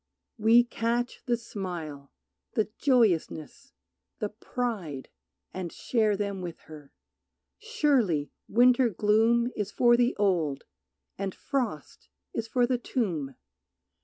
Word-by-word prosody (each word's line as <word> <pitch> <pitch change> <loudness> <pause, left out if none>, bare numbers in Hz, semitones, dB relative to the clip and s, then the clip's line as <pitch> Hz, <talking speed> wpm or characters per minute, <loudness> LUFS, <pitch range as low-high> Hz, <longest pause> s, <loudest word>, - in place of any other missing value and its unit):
We 225 +3 +6
catch 235 0 -2
the 240 -1 +2
smile, 175 -11 -6 0.4
the 220 - 0
joyousness, 235 - +1 0.5
the 210 - -2
pride, 210 - -4 0.4
And 180 -3 -5
share 215 -4 +1
them 200 -2 -3
with 175 -2 -7
her. 150 -3 -13 0.7
Surely 275 - +1 0.2
winter 245 +2 +5
gloom 225 +4 +3
Is 205 -2 -2
for 240 +3 +5
the 245 +1 +2
old, 170 -9 +1 0.6
and 195 -2 -3
frost 240 - -4 0.2
is 225 -1 -3
for 245 +1 +2
the 250 0 0
tomb. 165 - -2
215 Hz, 110 wpm, -28 LUFS, 175-240 Hz, 0.7 s, We